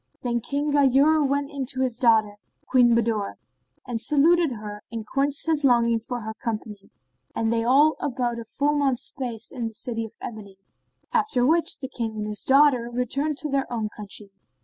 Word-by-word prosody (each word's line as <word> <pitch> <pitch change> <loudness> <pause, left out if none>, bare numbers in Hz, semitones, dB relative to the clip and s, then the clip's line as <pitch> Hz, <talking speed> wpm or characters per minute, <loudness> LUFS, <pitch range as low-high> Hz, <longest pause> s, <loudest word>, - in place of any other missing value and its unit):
Then 240 -1 -1
King 290 +4 -2
Ghayur 285 +2 +4
went 280 +1 -1
in 275 -3 -4
to 260 0 -1
his 250 -3 -1
daughter, 220 -4 +3 0.3
Queen 245 -2 +4
Budur,[FN#23] 225 -3 0 0.5
and 235 -3 -3
saluted 300 +4 +3
her 210 -2 -8
and 225 -2 -5
quenched 275 +4 +1
his 315 -2 +1
longing 235 -3 +3
for 245 +2 -5
her 220 0 -5
company, 215 -3 -6 0.5
and 225 0 0
they 230 0 +1
all 285 +6 +4
abode 245 -3 -2
a - - -6
full 285 +6 0
month's 270 -4 0
space 240 -5 -6
in 235 -3 -3
the 225 - -9
City 230 0 -3
of 225 - -8
Ebony; 200 -4 -9 0.6
after 425 - +2
which 325 +3 +2
the 265 - -4
King 230 -4 -4
and 210 - -3
his 210 -1 -3
daughter 265 -3 +4
returned 275 +5 -1
to 300 - -3
their 275 -2 -1
own 220 -3 -2
country. 205 -1 -8
245 Hz, 185 wpm, -24 LUFS, 225-280 Hz, 0.6 s, Ghayur